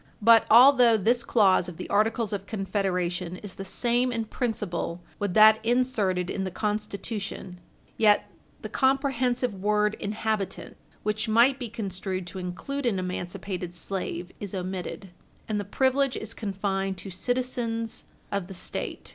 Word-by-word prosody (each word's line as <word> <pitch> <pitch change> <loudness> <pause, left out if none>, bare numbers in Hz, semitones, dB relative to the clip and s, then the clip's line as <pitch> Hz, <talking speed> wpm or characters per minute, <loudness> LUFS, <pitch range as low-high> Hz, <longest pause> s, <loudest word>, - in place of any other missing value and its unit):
But 225 +1 +6
although 245 -1 +7
this 235 +4 +2
clause 190 -5 +3
of 170 - -10
the - - -6
Articles 215 +1 +1
of 200 0 -4
Confederation 185 -4 -2
is 200 -3 -6
the 195 - -7
same 240 +5 +1
in 230 -2 -2
principle 205 -8 -3 0.2
with 205 -3 -2
that 220 0 +7
inserted 225 -7 +1
in 190 - -3
the 190 - -2
Constitution, 205 -2 -4 0.4
yet 210 -2 +4 0.4
the - - -3
comprehensive 260 -3 +1
word 210 +2 +1
inhabitant, 215 -1 -3 0.3
which 215 +2 -1
might 240 +5 +4
be 245 -3 -5
construed 190 -4 -4
to 185 +2 -7
include 185 +10 -4
an 210 -5 +1
emancipated 180 0 -4
slave, 180 -1 -4
is 200 -1 -6
omitted, 185 +1 -5 0.4
and 215 -1 -1
the - - -2
privilege 265 +5 +1
is - - -5
confined 195 -2 -2
to 190 +2 -8
citizens 230 +1 -2 0.3
of 200 -3 -2
the 190 - -9
State. - - -5
210 Hz, 145 wpm, -27 LUFS, 190-235 Hz, 0.4 s, although